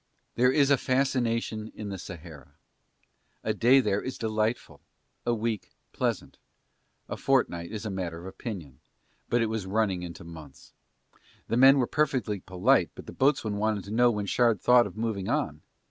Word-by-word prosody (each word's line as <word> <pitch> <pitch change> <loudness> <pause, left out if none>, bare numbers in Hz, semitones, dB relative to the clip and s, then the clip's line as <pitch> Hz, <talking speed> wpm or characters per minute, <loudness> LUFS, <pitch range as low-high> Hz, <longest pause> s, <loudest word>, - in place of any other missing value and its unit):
There 125 +1 +3
is 140 0 +3
a 140 - +6
fascination 115 -5 0
in 105 -1 -6
the 95 -1 -5
Sahara, 80 -7 -10 0.9
a - - 0
day 130 +3 +5
there 105 -5 +1
is 130 - -5
delightful, 110 +1 -2 0.5
a 120 - +3
week 110 -2 -2
is - - -37 0.2
pleasant, - - -2 0.7
a - - -4
fortnight 90 -11 0
is 110 0 -5
a 105 - -3
matter 90 -3 -4
of - - -11
opinion, 95 - -7 0.5
but 120 -1 +2
it - - 0
was 110 -3 -3
running 100 -3 0
into 85 -2 -8
months. 80 -5 -12 0.8
The 115 - +1
men 135 +2 +7
were 130 - +3
perfectly 130 -8 0
polite 95 +10 +2
but - - -10
the - - -8
boatswain 130 -7 +1
wanted 105 -1 0
to 100 - -9
know 120 +2 +4
when 105 -3 -2
Shard 115 +1 +2
thought 125 -2 +5
of 100 - -12
moving 110 -4 -2
on. - - -1
110 Hz, 175 wpm, -28 LUFS, 95-125 Hz, 0.9 s, men